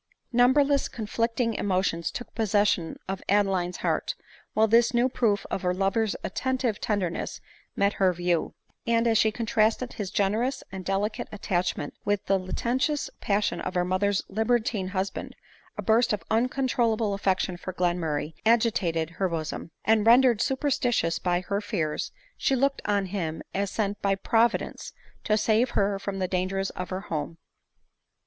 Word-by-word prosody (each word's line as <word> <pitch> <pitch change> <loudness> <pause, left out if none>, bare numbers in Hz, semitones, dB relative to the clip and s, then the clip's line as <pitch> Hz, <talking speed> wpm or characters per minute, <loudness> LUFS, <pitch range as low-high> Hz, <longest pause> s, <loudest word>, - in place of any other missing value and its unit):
Numberless 275 +3 +4
conflicting 230 +1 -1
emotions 185 -5 0
took 245 - -7
possession 205 -6 +1
of 195 0 -3
of - - -16
Adeline's 190 -3 +2
heart, - - 0 0.4
while 220 +1 +4
tliis 230 +2 +4
new 240 +2 +4
proof 230 -6 0
of - - -1
her 180 -1 0
lover's 195 +3 +1
attentive 255 -4 -1
tenderness 190 -6 -2 0.4
met 200 +1 +2
her 190 -1 +5
view; 175 -1 -1 0.3
and, 230 0 +3
as 225 -2 +4
she 220 - +4
contrasted 225 +2 +1
his 205 -4 -4
generous 220 +8 0
and 190 -1 -6
delicate 195 +3 -1
attachment 180 -7 -2
with 205 -1 0
the 195 0 +2
licentious 250 +10 -1
passion 205 0 0
of 185 - -4
her 180 0 +2
mother's 190 +2 +1
libertine 220 -1 0
husband, 190 +1 -3 0.4
a - - -3
burst 230 +1 +3
of 210 - -3
un 230 +3 +3
controlable 230 -5 +1
affection 190 -2 0
for 180 +1 -6
Glenmurray 175 -4 -1
agitated 195 -8 +2
her 185 +2 -1
bosom; 160 0 -4 0.2
and, 220 0 +3
rendered 240 -1 +6
superstitious 250 - +1
by 175 -1 0
her 200 +3 -2
fears, 155 -7 -2 0.2
she 270 - +1
looked 275 +2 +1
on 200 -1 +1
him 175 -5 -3
as 200 0 -1
sent 205 -1 -2
by 200 -1 +2
Providence 230 +4 0 0.3
to 215 - +3
save 225 +3 +2
her 200 0 +2
from 195 0 -4
the 185 -1 -1
dangers 190 +1 -1
of 180 - -6
her 185 0 -3
home. 160 -3 -4
205 Hz, 155 wpm, -27 LUFS, 185-230 Hz, 0.4 s, rendered